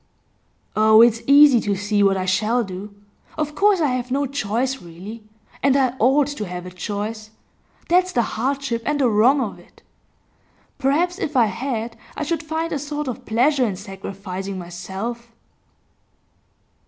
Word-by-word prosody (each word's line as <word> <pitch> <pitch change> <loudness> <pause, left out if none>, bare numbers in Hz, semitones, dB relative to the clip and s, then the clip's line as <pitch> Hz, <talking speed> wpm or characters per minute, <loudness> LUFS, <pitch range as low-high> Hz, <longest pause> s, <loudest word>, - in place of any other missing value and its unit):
'Oh, 220 +1 +7
it's 230 -1 +3
easy 280 -3 +7
to 205 -1 -1
see 205 +1 0
what 195 -1 +4
I 185 - -2
shall 215 +6 +1
do. 195 +1 -7 0.5
Of 300 -1 -2
course 400 +4 +3
I 305 -4 +2
have 250 0 -2
no 280 +2 0
choice 260 0 -2
really. 185 +7 -10 0.4
And 275 0 +3
I 260 -3 +2
ought 270 +5 +4
to 220 -8 -5
have 180 0 -6
a 180 - -8
choice; 210 +3 -5 0.6
that's 365 +1 +3
the 240 -6 +2
hardship 255 +1 -2
and 295 +3 -1
the 265 - +3
wrong 240 +7 +4
of - - -3
it. - - -21 1.0
Perhaps 330 +7 +1
if 305 -9 -2
I 235 - +6
had, 230 +1 -4 0.2
I - - -2
should 330 +2 -2
find 320 +1 -3
a 290 - -1
sort 295 +1 -4
of 250 - -6
pleasure 255 +5 +2
in 210 -6 0
sacrificing 195 -1 -7
myself. 190 +7 -6
235 Hz, 160 wpm, -21 LUFS, 205-280 Hz, 1.0 s, Oh